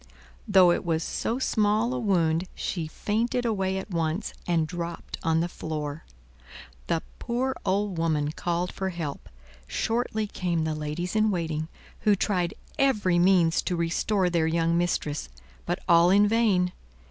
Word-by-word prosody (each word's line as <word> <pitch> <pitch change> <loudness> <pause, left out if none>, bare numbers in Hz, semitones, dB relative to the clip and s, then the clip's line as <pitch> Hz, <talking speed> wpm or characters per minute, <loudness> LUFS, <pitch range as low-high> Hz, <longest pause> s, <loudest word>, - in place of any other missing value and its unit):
Though 190 -4 +6
it - - 0
was 165 -2 0
so 230 - -2
small 220 -1 +1
a 255 - -2
wound, 175 -5 +1
she 165 -4 -3
fainted 230 +9 -1
away 190 -4 0
at 190 +2 -6
once 165 +3 -1
and 170 -3 +2
dropped 170 0 -6
on 160 0 +2
the 170 - 0
floor. 155 -2 -5 0.8
The - - 0 0.2
poor 260 +2 -1
old 195 -2 0
woman 155 -3 +1
called 175 +2 -2
for 190 -1 -3
help; 165 -6 -5 0.4
shortly 225 - -1
came 175 -5 -1
the 160 0 -1
ladies 155 +5 -4
in 215 0 +3
waiting, 160 -4 -2 0.3
who 210 -1 +3
tried 180 -4 0 0.2
every 210 -10 +3
means 175 -2 +4
to 180 - -2
restore 175 +3 +1
their 165 -2 +2
young 165 +1 +1
mistress; 160 - -1 0.4
but 175 - 0
all 170 0 +6
in 205 +2 +5
vain. 205 -5 +2
175 Hz, 150 wpm, -27 LUFS, 165-205 Hz, 0.8 s, Though